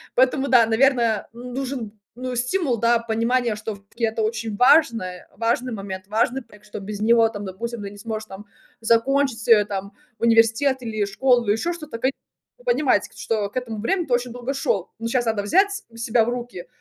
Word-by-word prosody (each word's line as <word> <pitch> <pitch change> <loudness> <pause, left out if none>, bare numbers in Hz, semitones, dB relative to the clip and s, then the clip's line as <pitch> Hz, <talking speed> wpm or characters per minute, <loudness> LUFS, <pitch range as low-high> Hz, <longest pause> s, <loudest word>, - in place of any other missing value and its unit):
Поэтому 260 +2 +3
да, 245 -3 +6
наверное, 235 -2 +2
нужен, 250 -2 -5 0.2
ну, 255 +1 -4
стимул, 250 +2 0
да, 235 +1 +3
понимание, 230 +1 0
что 215 0 -5
всё-таки 200 +4 -11
это 220 0 -1
очень 220 -1 -2
важное, 230 - +3
важный 235 +3 0
момент, 190 -2 -6
важный 230 +5 0
проект, 210 -2 -19
что 210 - -7
без 205 +1 -6
него 230 +1 +5
там, 205 -2 -7
допустим, 230 +5 -5
ты 200 - -5
не 205 - -12
сможешь 220 0 -5
там 195 +1 -10 0.4
закончить, 230 +1 +1
э, 215 -3 +7
там, 200 0 -5 0.3
университет 230 +4 +3
или 215 -3 -1
школу, 240 +3 +2
ещё 225 +12 +1
что-то. 305 -8 -7 0.7
Понимать, 300 - +2
что 210 -3 -1
к - - -29
этому 230 -4 -4
времени 350 - 0
ты 255 - -1
очень 245 0 0
долго 245 +2 -4
шел, 235 - -1
но 230 - -3
щас 240 +1 0
надо 220 -2 0
взять 380 - +4 0.3
себя 230 0 +2
в - - -1
руки, 240 -7 -6
230 Hz, 180 wpm, -23 LUFS, 215-250 Hz, 0.7 s, э